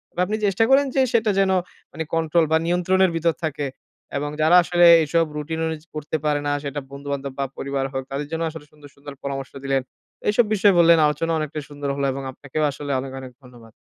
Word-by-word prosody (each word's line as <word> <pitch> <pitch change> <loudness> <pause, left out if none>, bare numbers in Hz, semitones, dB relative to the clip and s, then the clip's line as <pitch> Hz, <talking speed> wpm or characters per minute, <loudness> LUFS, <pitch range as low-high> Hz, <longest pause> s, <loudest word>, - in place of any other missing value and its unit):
বা - - -6
আপনি 210 +4 -2
চেষ্টা 200 +3 +2
করেন 275 +1 +5
যে 265 - +4
সেটা 220 -2 +3
যেন 190 -1 +3 0.4
মানে 160 +2 -4
কন্ট্রোল 165 0 +2
বা 160 - +5
নিয়ন্ত্রণের 180 +1 +2
ভিতর 165 0 +1
থাকে। 145 -2 -3 0.5
এবং 145 +1 -2
যারা 160 +3 +5
আসলে 175 0 +3 0.2
এসব 165 +2 +1
রুটিন 160 +2 -4
অনুযায়ী 160 0 -5
করতে 155 +1 -3
পারে 150 -1 +2
না 145 - +1
সেটা 140 0 -4
বন্ধুবান্ধব 140 0 -5
বা 140 - +1
পরিবার 135 0 -2
হোক 135 0 -2
তাদের 140 +2 -3
জন্য 165 +1 -2
আসলে 160 -2 -10
সুন্দর, 150 -1 -16
সুন্দর 145 0 -10
পরামর্শ 135 -1 -4
দিলেন। 135 -1 +1 0.5
এসব 215 +2 +3
বিষয়ে 200 -3 +4
বললেন, 170 0 +7
আলোচনা 150 +3 0
অনেকটাই 155 0 -4
সুন্দর 145 -1 -5
হলো 140 0 -1
এবং 135 +1 -5
আপনাকেও 145 +3 -4
আসলে 145 +1 -6
অনেক, 135 0 -6
অনেক 130 -1 -9
ধন্যবাদ। 120 -3 -16
150 Hz, 205 wpm, -22 LUFS, 140-170 Hz, 0.5 s, বললেন